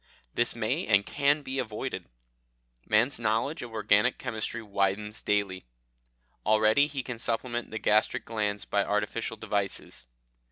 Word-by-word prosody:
This 120 0 +1
may 110 -2 -1
and 100 -1 +4
can 145 +1 +2
be 135 0 -3
avoided. 110 -5 -4 0.8
Man's 115 +6 +3
knowledge 115 +8 0
of 120 - -7
organic 110 -1 +3
chemistry 110 +1 -3
widens 100 +1 -1
daily. 100 -6 -1 0.8
Already 110 +6 +4
he 140 -3 -4
can 125 -2 -6
supplement 120 +1 -2
the 110 - -4
gastric 110 0 +2
glands 105 -2 -2
by 100 -1 +1
artificial 105 +2 -1
devices. 100 - -3
110 Hz, 130 wpm, -29 LUFS, 105-120 Hz, 0.8 s, and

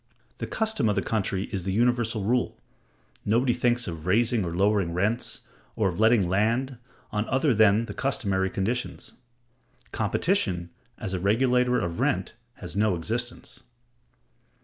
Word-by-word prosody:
The - - -3
custom 220 - 0
of 105 - +1
the - - 0
country 100 -3 -1
is 100 -3 -2
the 95 +2 -3
universal 115 0 +1
rule; 120 +4 0 0.7
nobody 120 +4 +2
thinks 120 -1 +1
of 80 -1 -6
raising 110 +2 +3
or 85 -1 -4
lowering 100 -2 +2
rents, 105 +6 -1 0.3
or 105 -3 +2
of 90 +1 -6
letting 110 -4 +4
land, 115 +7 0 0.3
on 105 +1 -2
other 135 +1 +2
than 110 +1 +4
the - - -7
customary 100 -8 0
conditions. 115 +7 -3 0.8
Competition, 95 - 0 0.3
as 95 - -5
a 95 - -1
regulator 125 +5 +2
of 85 -1 -3
rent, - - 0 0.2
has - - -8
no 105 -2 +2
existence. 120 +8 -4
110 Hz, 145 wpm, -26 LUFS, 95-120 Hz, 0.8 s, letting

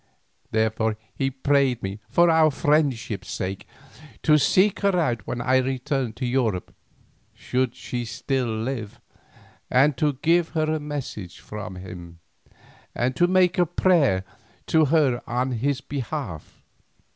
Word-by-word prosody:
Therefore 110 0 0 0.2
he 135 - -1
prayed 135 -2 +1
me 95 +2 -4
for 170 0 +4
our 160 -1 +5
friendship's 135 -10 0
sake 95 +1 -4 0.6
to 150 -1 +5
seek 190 +7 +3
her 200 -2 +2
out 120 - -1
when 120 - -3
I 130 +2 +3
returned 130 -2 -1
to 130 - -3
Europe, 120 -7 -1 0.6
should 125 -1 -1
she 120 -1 -4
still 130 +2 -2
live, 110 -1 -4 0.7
and 135 +3 +4
to 150 +2 +1
give 170 0 +3
her 155 - +3
a 155 - -1
message 140 - -6
from 105 -3 -7
him, 90 -2 -9 0.8
and 125 +1 0
to 175 +7 +3
make 185 0 +3
a 175 - +5
prayer 150 - +3 0.4
to 160 -1 +4
her 140 -5 +2
on 125 +2 -1
his 135 +4 -1
behalf." 135 - -6
130 Hz, 135 wpm, -24 LUFS, 110-150 Hz, 0.8 s, our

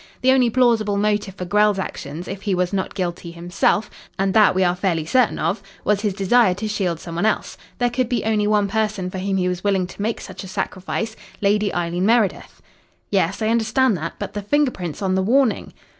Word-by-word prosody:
The 260 - +4
only 255 -2 +4
plausible 230 -4 +2
motive 205 -1 0
for 180 - -5
Grell's 210 +2 +3
actions, 170 -3 -5
if 195 0 -6
he 200 -2 0
was 180 +1 -1
not 190 -1 -2
guilty 175 -2 -3
himself 175 +5 0 0.3
and 195 0 +1
that 215 -4 +5
we 190 - +3
are 175 0 +2
fairly 180 -4 -1
certain 255 +6 +2
of 195 - -1 0.2
was 205 -1 +1
his 205 -3 -1
desire 200 0 +3
to 215 +3 -4
shield 185 -6 -1
some 170 - -8
one 170 +5 -1
else. - - -1 0.2
There 245 -1 +1
could 245 0 -1
be 245 -4 -1
only 215 -1 +1
one 210 -1 +2
person 210 -3 -1
for 190 - -5
whom 195 +1 -1
he 180 -1 +1
was 180 0 -3
willing 195 -3 +1
to 185 - -9
make 220 +2 -1
such 190 0 -9
a - - -8
sacrifice 190 +4 -3 0.2
Lady 205 0 +2
Eileen 175 +2 -1
Meredith." 225 -4 +1 0.5
"Yes, 195 +1 +1
I 215 - +1
understand 230 +1 +2
that. 165 +1 -4
But - - -6
the 205 - -3
finger 290 +6 +2
prints 175 -2 -6
on 190 -1 +1
the 190 - +2
warning?" 245 +4 +2
200 Hz, 220 wpm, -21 LUFS, 185-220 Hz, 0.5 s, that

